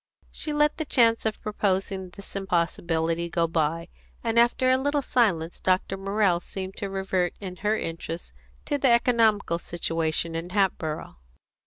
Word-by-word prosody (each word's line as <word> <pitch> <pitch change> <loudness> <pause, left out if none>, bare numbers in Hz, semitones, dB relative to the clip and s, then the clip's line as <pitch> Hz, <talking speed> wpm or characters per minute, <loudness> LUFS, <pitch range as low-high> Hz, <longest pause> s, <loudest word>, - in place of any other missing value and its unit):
She 305 - -3
let 295 0 +2
the 315 - -1
chance 230 -5 +3
of 220 - -3
proposing 195 -2 -1
this 200 +2 -11
impossibility 170 -2 0
go 170 0 +1
by; 165 +1 -1 0.3
and 230 0 +2
after 240 +2 +4
a 260 - +4
little 285 +1 0
silence 185 -11 +1
Dr. 185 +1 +1
Morrell 195 -2 +1
seemed 190 +2 -7
to 200 - -3
revert, 190 -2 -1
in 185 -2 -7
her 210 +3 +1
interest, 165 +1 -5 0.3
to 290 -1 -1
the 265 - +3
economical 225 -7 +3
situation 165 -1 -1
in 165 +2 -4
Hatboro'. 180 - -1
190 Hz, 150 wpm, -26 LUFS, 170-225 Hz, 0.3 s, after